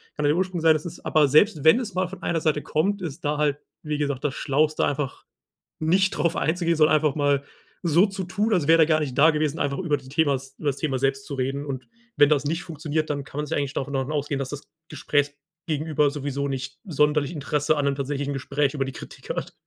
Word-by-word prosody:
Kann 150 - -2
ja - - +4
der 150 - +2
Ursprung 185 -2 -1
sein, 160 -1 +6
dass 155 +2 -3
es 170 - -7
aber 155 -2 +4
selbst 155 +1 +4
wenn 160 +10 +6
es 225 -6 -5
mal 185 -1 +1
von 190 0 -11
einer 165 -2 0
Seite 150 -2 +1
kommt, 195 +6 0
ist 155 -5 -6
da 145 0 0
halt, 145 -1 +1 0.3
wie 150 -1 -2
gesagt, 140 -3 -2
das 140 -3 0
schlauste 155 +3 +1
einfach 145 -2 -3 0.5
nicht 185 +5 +2
darauf 170 -1 +1
einzugehen, 170 +2 0
sondern 155 0 +5
einfach 150 -2 0
mal 145 -2 +1 0.4
so 170 +3 +4
zu 195 -1 -5
tun, 205 +5 0
als 170 -7 +1
wäre 165 0 +6
er - - +3
gar 155 -1 +3
nicht 135 -4 -4
da 155 +3 +7
gewesen, 155 0 -1
einfach 140 -1 -1
über 155 -6 0
die 130 -1 -14
Themas 140 -3 0
übers 145 -3 -1
Thema 135 -4 -1
selbst 135 0 0
zu 140 - -7
reden. 135 +2 -2
Und 130 -3 -5 0.3
wenn 145 - +6
das 145 -2 +2
nicht 165 +3 -1
funktioniert, 155 -1 -3
dann 145 -1 -2
kann 140 - -7
man 150 - -2
sich - - -1
eigentlich 140 -1 -2
davon 140 +1 -3
davon 135 +2 -1
ausgehen, 145 -1 -1
dass 135 -1 -3
das 145 0 -6 0.3
Gesprächgegenüber 150 +1 -1
sowieso 140 -1 -3
nicht 135 0 -5
sonderlich 150 -2 +1
Interesse 150 +1 0
an 145 - 0
'nem 140 -1 +1
tatsächlichen 140 0 -3
Gespräch 140 +1 -1
über 135 -2 0
die 135 - -5
Kritik - - -11
hat. - - -4
150 Hz, 235 wpm, -24 LUFS, 140-160 Hz, 0.5 s, da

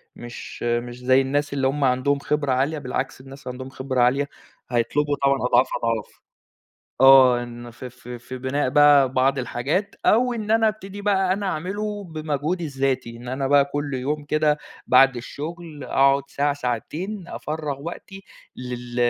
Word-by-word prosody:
مش 120 0 -9
مش 120 +1 -2
زي 130 +1 +4
الناس 145 +2 -1
اللي 135 -1 +1
همُ 140 +2 -1
عندهم 130 +2 +2
خبرة 145 -1 -1
عالية، 135 +5 +1
بالعكس 130 -1 -4
الناس 135 +1 -13
اللي - - -2
عندهم 130 +1 -8
خبرة 130 -1 -2
عالية 135 +4 +2 0.4
هيطلبوا 145 +5 +1
طبعًا 140 0 +4
أضعاف 125 - +4 0.2
أضعاف، 115 -3 -2 0.8
آه، 130 -2 +7
إن 120 0 -9
ف 120 +2 -14
ف 125 -1 -12
في 125 +1 -7
بِناء 130 +1 -1
بقى 145 -1 +6
بعض 135 +1 +2
الحاجات، 140 - -2
أو 245 +3 +4
إن 215 -2 -3
أنا 225 0 +4
أبتدي 205 -2 -5
بقى 200 -2 +2
إن - - +1
أنا 205 - -4
أعمله 205 +4 -3
بمجهودي 155 0 -3
الذاتي، 135 -4 -2
إن 120 +1 -11
أنا 135 +2 -2
بقى 140 0 +5
كُلّ 145 0 -4
يوم 145 +4 -2
كده 150 0 +1 0.3
بعد 135 +1 +6
الشُّغل 155 +4 -7
أقعد 140 +1 +3
ساعة، 145 +1 0
ساعتين 150 - -4
أفرغ 150 -3 -5
وقتي، 195 +4 -8 0.3
لل 125 -1 -7
140 Hz, 165 wpm, -23 LUFS, 125-155 Hz, 0.8 s, آه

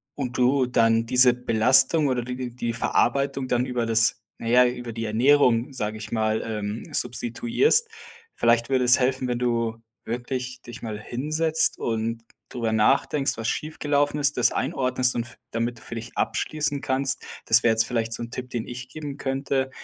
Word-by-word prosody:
und 130 -3 -4
du 130 +1 +3
dann 115 -2 +2
diese 125 +1 +6
Belastung 130 +6 +4
oder 125 -2 -1
die 125 0 -6
die 120 -2 -3
Verarbeitung 135 +3 0
dann 125 0 +1
über 125 -2 -2
das 115 -1 +3 0.2
na - - -6
ja, 125 +2 +5
über 120 -1 -4
die 115 0 -4
Ernährung, 125 +2 +2
sage 110 -4 -3
ich 110 - -9
mal, 110 -1 0
ähm, 105 -1 -5
substituierst. 240 - +1 0.5
Vielleicht 115 +1 +2
würde 130 -2 +1
es 125 +1 +6
helfen, 130 0 0
wenn 120 -1 -2
du 115 -2 -1 0.3
wirklich 125 +2 -5
dich 120 -2 -11
mal 110 -2 -5
hinsetzt 155 +8 +1
und 115 0 -3 0.3
darüber 115 -3 -3
nachdenkst, 135 +6 +1
was 115 0 -4
schiefgelaufen 145 -1 -1
ist, 140 0 +2
das 125 - +3
einordnest 130 -2 +1
und 120 - -1
f 120 - -14
damit 115 +1 -3
du - - -19
für 115 - -9
dich 115 +1 -8
abschließen 150 -2 -1
kannst. 135 -2 -1 0.2
Das 115 +2 +5
wäre 120 - +4
jetzt 110 0 +3
vielleicht 115 -2 -2
so'n 115 0 -5
Tipp, 125 0 -6
den 115 -2 -3
ich 125 +1 -8
geben 145 0 -7
könnte. 135 0 -2
125 Hz, 175 wpm, -24 LUFS, 115-135 Hz, 0.5 s, diese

